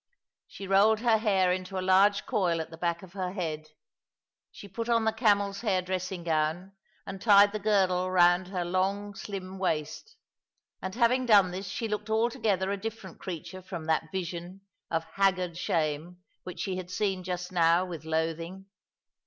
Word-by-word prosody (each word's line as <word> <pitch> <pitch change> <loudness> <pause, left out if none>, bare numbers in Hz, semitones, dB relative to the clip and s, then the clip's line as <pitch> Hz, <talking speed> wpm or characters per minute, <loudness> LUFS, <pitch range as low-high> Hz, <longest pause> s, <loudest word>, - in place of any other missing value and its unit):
She 195 - -9
rolled 210 +3 +4
her 230 -2 +3
hair 195 -4 +2
in 185 0 -1
a 190 -1 -3
large 190 +2 +3
coil 175 -5 0
at 160 - -5
the 165 - -10
back 170 0 -1
of 185 -1 -13
her 185 -2 -3
head. 155 -5 -4 0.8
She 200 - -11
put 230 +5 -5
on 230 -1 +2
the 220 - +2
camel's 205 -3 +1
hair 195 -5 +1
dressing 185 -1 -4
gown, 160 +3 -1 0.3
and 195 -1 -7
tied 205 -2 +6
the 215 - -3
girdle 190 -3 +2
round 180 0 +4
her 180 -2 -3
long, 195 +3 -1
slim 195 -2 -7
waist, 165 - -3 0.7
and 190 +1 -5
having 250 +1 +2
done 200 -5 +6
this 190 +2 -5
she 225 +5 -3
looked 210 0 -4
altogether 220 -4 +1
a 200 - -1
different 205 -3 -7
creature 185 +1 -7
from 175 -3 -7
that 160 0 0
vision 180 0 -5 0.3
of 165 -1 -1
haggard 180 0 0
shame 165 0 -2 0.3
which 180 - -6
she 190 -2 -2
had 180 -1 -6
seen 190 -1 -1
just 180 0 -4
now 170 0 +3
with 170 -4 -7
loathing. 165 +4 -3
185 Hz, 170 wpm, -28 LUFS, 175-200 Hz, 0.8 s, tied